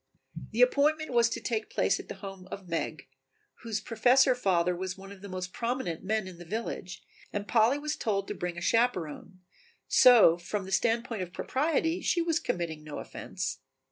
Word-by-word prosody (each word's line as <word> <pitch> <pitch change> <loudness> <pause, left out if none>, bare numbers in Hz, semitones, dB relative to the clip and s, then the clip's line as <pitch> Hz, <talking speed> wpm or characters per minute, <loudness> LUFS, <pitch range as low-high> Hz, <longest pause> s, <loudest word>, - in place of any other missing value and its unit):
The - - +4
appointment 310 - +2
was 235 -1 +4
to - - -3
take 220 -3 -2
place - - +1
at - - -9
the - - -5
home 195 -2 -9
of 190 -1 -8
Meg, 165 -1 -3 0.5
whose 225 -3 -2
Professor 250 +4 +4
father 180 -7 +1
was 185 +1 -4
one 195 +1 -11
of 200 -2 -12
the 200 - -9
most 185 0 -5
prominent 235 -8 -2
men 215 0 -1
in 180 -2 -10
the - - -8
village 185 -1 -5 0.3
and 205 0 -4
Polly 235 +4 +4
was 300 +1 -3
told 200 -4 -1
to - - -3
bring 180 -3 -4
a - - -5
chaperon, 185 -5 0 0.5
so 220 -9 +7
from 195 +3 -4
the 190 - -8
standpoint 230 +1 0
of 180 -1 -5
propriety 325 - 0
she 345 - +1
was 335 -1 +1
committing 160 -3 -3
no 150 -1 -7
offence. - - -5
210 Hz, 185 wpm, -29 LUFS, 185-245 Hz, 0.5 s, so